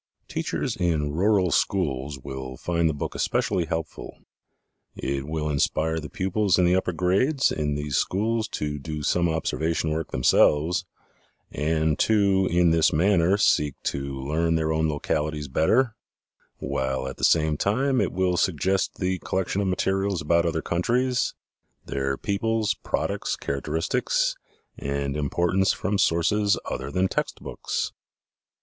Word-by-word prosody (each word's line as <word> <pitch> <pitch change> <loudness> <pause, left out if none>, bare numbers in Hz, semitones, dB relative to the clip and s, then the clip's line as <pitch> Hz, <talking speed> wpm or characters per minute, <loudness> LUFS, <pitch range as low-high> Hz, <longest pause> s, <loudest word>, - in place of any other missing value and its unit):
Teachers - - -2
in 80 -4 0
rural 95 +1 +2
schools 75 -5 0
will 65 -1 -7
find 85 -1 0
the - - 0
book - - -4
especially 90 - 0
helpful. 80 0 -5 0.8
It 70 +1 -3
will 80 0 -2
inspire 80 +2 0
the 75 - -7
pupils 100 0 +1
in 90 - +4
the 90 +1 +4
upper 95 -1 0
grades 100 - +2
in 75 -2 -1
these 75 -1 -2
schools 110 +3 0
to 75 -1 -3
do 75 +2 -5
some 85 +3 +2
observation 80 0 -1
work 80 0 -2
themselves 75 +8 +3 0.7
and 80 0 0
to 100 -3 +3
in 85 -1 +3
this 80 -1 +4
manner 90 +3 +3
seek 75 -8 +2
to 70 0 -3
learn 80 +5 0
their 80 -1 0
own 80 0 +1
localities 75 0 -2
better, 110 - +2 0.6
while 65 0 -2
at 65 - -7
the - - -9
same 80 -2 +3
time 130 - +1
it - - 0
will 90 -1 0
suggest 95 +3 +1
the 95 0 -1
collection 95 +1 -1
of 100 - -1
materials 95 0 0
about 85 +2 +2
other 80 -1 -1
countries, 125 +9 0 0.5
their 70 0 -2
peoples, 110 +1 0
products, - - -2
characteristics 75 +4 -1 0.4
and 70 0 -2
importance 85 +6 +1
from 100 +2 -2
sources 100 +4 +2
other 65 +1 -4
than 90 +5 +1
text - - -2
books. - - -3
80 Hz, 140 wpm, -25 LUFS, 75-95 Hz, 0.8 s, in